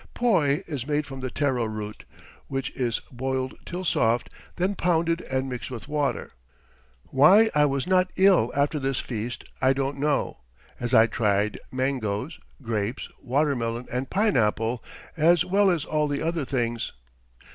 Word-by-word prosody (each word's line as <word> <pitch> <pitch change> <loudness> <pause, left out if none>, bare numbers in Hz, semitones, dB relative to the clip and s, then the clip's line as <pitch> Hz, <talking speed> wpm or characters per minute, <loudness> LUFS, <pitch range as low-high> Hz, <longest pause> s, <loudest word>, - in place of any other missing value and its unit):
Poi 165 -13 +2
is 140 -5 -5
made 150 0 0
from 135 -2 -8
the 130 0 -3
taro 130 -4 0
root, 110 -1 -6 0.4
which 135 0 -3
is 120 -3 -1
boiled 130 +1 -2
till 180 +2 -4
soft, 120 -8 +1 0.2
then 185 +3 0
pounded 170 -2 +1
and 130 0 -1
mixed 125 -2 -5
with 125 -1 -7
water. 145 -1 -1 0.8
Why 190 +12 +6
I 150 0 +4
was 140 -1 0
not 185 0 +3
ill 190 -1 +4
after 145 +2 +1
this 135 -1 -1
feast 120 0 -4 0.2
I 130 +1 +4
don't 135 +1 -2
know, 145 - 0 0.4
as 120 +1 0
I 110 - +8
tried 105 -3 0
mangoes, 130 +1 -2 0.2
grapes, 115 +1 -2
watermelon, 125 -3 0
and 130 +1 -2
pineapple, 120 - +1 0.3
as 170 +1 +4
well 200 +1 +3
as 165 -5 0
all 150 -1 0
the 145 -1 -2
other 165 -3 -1
things. 120 -3 -2
135 Hz, 150 wpm, -25 LUFS, 120-155 Hz, 0.8 s, I